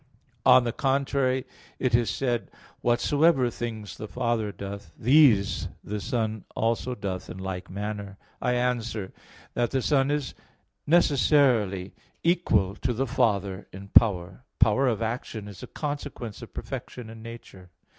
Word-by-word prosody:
On 130 -1 +8
the 120 - -1
contrary, 135 -1 +1 0.3
It 125 -2 0
is 120 -1 +3
said 120 -3 0
(John - - -21
5:19): - - -32 0.3
"Whatsoever 130 +3 +3
things 110 -3 -5
the 110 - -6
Father 115 -2 -1
doth, 100 +1 -7
these 125 -6 +4 0.2
the 105 +1 -4
Son 110 -3 -2
also 115 +3 0
doth 95 -3 -5
in - - -7
like 95 -1 -5
manner." 100 0 -5 0.2
I 125 - +1
answer 115 -5 -1 0.4
that, 120 -1 +1
The 130 -2 -1
Son 135 -2 +3
is 145 -3 -1 0.5
necessarily 135 - +3 0.3
equal 140 - +2
to 125 -1 -1
the 130 +4 0
Father 100 -6 0
in 100 +1 -10
power. 100 0 +4
Power 115 +5 +4
of 115 -2 0
action 110 -2 -4
is 100 -4 -10
a - - -7
consequence 145 -7 -5
of 115 - -10
perfection 125 -2 -6
in 110 0 -10
nature. 115 -5 -11
115 Hz, 145 wpm, -27 LUFS, 100-130 Hz, 0.5 s, On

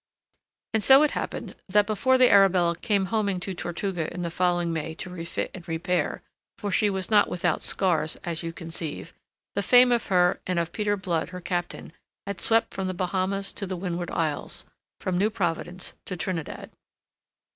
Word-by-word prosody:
And 220 -1 +1
so 270 +5 +8
it 300 - +2
happened - - -4
that 205 +2 +4
before 225 +5 +2
the 255 -1 +6
Arabella 185 -4 +5
came 200 0 0
homing 200 -4 +1
to 190 +1 -3
Tortuga 175 -1 -3
in 180 0 -5
the 170 - -3
following 175 -1 +1
May 160 0 -3
to 180 - -7
refit 170 -1 -4
and 180 -2 -10
repair 175 +2 -1 0.3
for 205 - -3
she 210 +2 +3
was 190 +1 -3
not 205 -1 +5
without 175 -2 0
scars, 175 -5 +1
as 170 -2 -3
you 165 -1 -4
conceive 165 -2 -5 0.4
the 200 - 0
fame 245 +4 +6
of 235 -2 +1
her 180 -2 +3
and 180 -1 0
of 170 0 0
Peter 205 0 0
Blood 170 -4 -1
her 180 0 -7
captain 175 -2 -4 0.3
had 200 -2 -5
swept 225 0 +2
from 190 -1 -2
the 185 - -3
Bahamas 190 +2 -1
to 200 - -5
the 185 -1 -3
Windward 175 -1 -3
Isles, 155 -3 -2 0.3
from 180 -1 -1
New 205 +3 +3
Providence 180 -3 -3
to 185 - -5
Trinidad. 170 -3 -4
185 Hz, 180 wpm, -26 LUFS, 170-200 Hz, 0.4 s, so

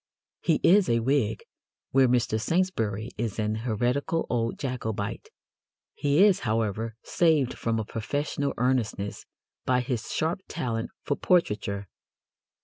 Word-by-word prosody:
He 165 -3 +2
is 195 +1 +5
a 115 - +3
Whig, 115 -3 +1 0.5
where 135 -1 +5
Mr. 120 -3 +1
Saintsbury 115 - 0
is 115 -3 -2
an 110 -1 0
heretical 120 +8 0
old 115 -1 0
Jacobite. 110 -7 -4 0.6
He 145 +6 +3
is, 205 -3 +5
however, 110 -1 -1
saved 155 -7 +2
from 115 -1 -1
a 110 - -2
professorial 140 +6 -2
earnestness 120 -5 -1 0.4
by 125 -1 +2
his 125 -2 -3
sharp 165 +4 -1
talent 115 -8 -3
for 145 - 0
portraiture. 105 - +1
120 Hz, 125 wpm, -27 LUFS, 110-145 Hz, 0.6 s, is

